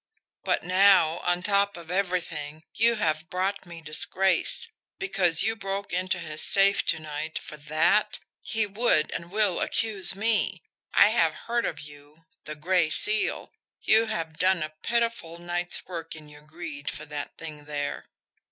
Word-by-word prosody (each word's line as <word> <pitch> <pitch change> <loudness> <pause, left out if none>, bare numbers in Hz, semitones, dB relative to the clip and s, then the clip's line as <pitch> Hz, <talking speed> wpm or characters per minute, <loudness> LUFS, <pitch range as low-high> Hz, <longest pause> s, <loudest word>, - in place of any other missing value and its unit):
"But - - 0
now, 185 -3 +4
on 175 0 -1
top 200 -1 +2
of 170 0 -10
everything, 165 -5 -2
you 230 +1 +3
have 160 -5 -1
brought 190 +1 -2
me 170 -1 -10
disgrace 180 +4 0 0.3
because 190 - +3
you 225 +1 +1
broke 195 -2 -5
into 185 0 0
his 155 -3 -5
safe 200 0 +3
to - - +3
night 155 0 -5
for - - -8
THAT? 155 +8 +1 0.3
He 220 -1 0
would 200 -6 +1
and 170 0 -6
will 205 -2 0
accuse 205 -4 +2
me. 200 -4 +1 0.3
I - - +6
have 165 -8 +1
heard 235 0 0
of - - -5
you 150 +2 -13 0.2
the 155 - -6
Gray 170 +1 +1
Seal 215 +6 +1 0.3
you 225 +1 +3
have 165 -7 -4
done 185 -3 +2
a 155 0 -6
pitiful 230 -8 -1
night's 175 +1 -2
work 165 -3 -7
in 155 -1 -12
your 150 0 -15
greed 150 -2 -7
for 150 - -7
that 145 -1 -6
thing 150 -3 -9
there." 145 -1 -5
175 Hz, 160 wpm, -26 LUFS, 155-200 Hz, 0.3 s, I